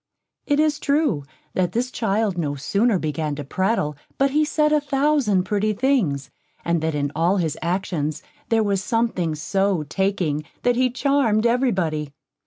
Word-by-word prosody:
It 290 0 +2
is 305 -1 +2
true, 280 - +1 0.3
that 180 -2 0
this 250 +2 -1
child 215 -3 0
no 150 -5 -2
sooner 200 - +1
began 155 -2 -2
to 145 - -5
prattle, 185 0 0 0.2
but 275 0 +2
he 305 +2 +3
said 300 0 +2
a 300 - +3
thousand 275 -8 +2
pretty 210 +2 0
things, 200 - 0 0.3
and 170 -1 +1
that 160 -1 -1
in 145 -1 -1
all 170 +5 +2
his 160 -5 0
actions 170 -3 -2 0.3
there 225 -1 +3
was 200 -2 0
something 225 -9 0
so 185 +3 0
taking, 170 -3 -1 0.2
that 245 0 +3
he 255 +1 +2
charmed 250 -4 +1
every 250 +2 +3
body. 155 -7 -2
195 Hz, 165 wpm, -22 LUFS, 155-250 Hz, 0.3 s, he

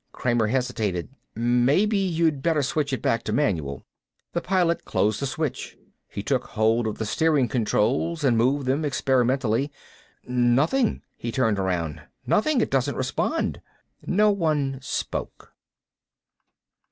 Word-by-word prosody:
Kramer 120 -3 +1
hesitated. 105 - -1 0.3
"Maybe 125 - +2
you 170 -4 +2
better 150 +1 0
switch 140 +1 -1
it 130 - -3
back 115 - +1
to - - -2
manual." 85 - -1 0.5
The 170 - -1
Pilot 180 -2 +1
closed 105 0 0
the 140 - -1
switch. 135 -1 -4 0.3
He - - -6
took - - 0
hold 110 +1 +1
of 110 - -3
the 110 - -3
steering 150 +2 +2
controls 130 +8 0
and 130 -4 +3
moved 130 +5 +2
them 135 +4 0
experimentally. 130 -2 +1 0.6
"Nothing." 125 - +2
He 120 - -5
turned 110 -4 +1
around. 85 -5 -2 0.2
"Nothing. 265 +3 +2
It - - -1
doesn't 135 +1 0
respond." 130 0 -1 0.5
No 210 +3 +4
one 150 -8 0
spoke. 135 - -5
130 Hz, 130 wpm, -25 LUFS, 115-155 Hz, 0.6 s, No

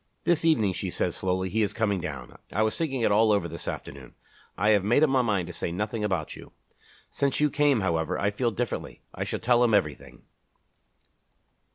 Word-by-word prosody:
"This 170 -2 +2
evening," 115 - +3
she - - -4
said - - -1
slowly, 95 0 -1
"he 110 +5 0
is 105 -1 0
coming 105 -5 0
down. 70 -7 -7 0.2
I 110 - +1
was 110 - 0
thinking 135 -6 -2
it 115 - +2
all 110 +1 +4
over 100 -5 +1
this 85 0 -8
afternoon. 65 -2 -7 0.4
I 105 +3 +3
had 100 -3 +3
made 120 +9 +3
up 155 - +3
my 130 -1 +4
mind 105 -7 0
to 90 - -8
say 85 - -4
nothing 105 +4 -3
about 95 -7 -2
you. - - -13 0.6
Since 140 -1 0
you 150 -1 +2
came, 145 -6 +3
however, 80 -3 0
I 100 - 0
feel 120 +4 0
differently. 120 0 -4
I - - -3
shall - - -3
tell 120 +1 +3
him 115 -3 +4
everything." 75 -7 -2
105 Hz, 205 wpm, -27 LUFS, 90-120 Hz, 0.6 s, all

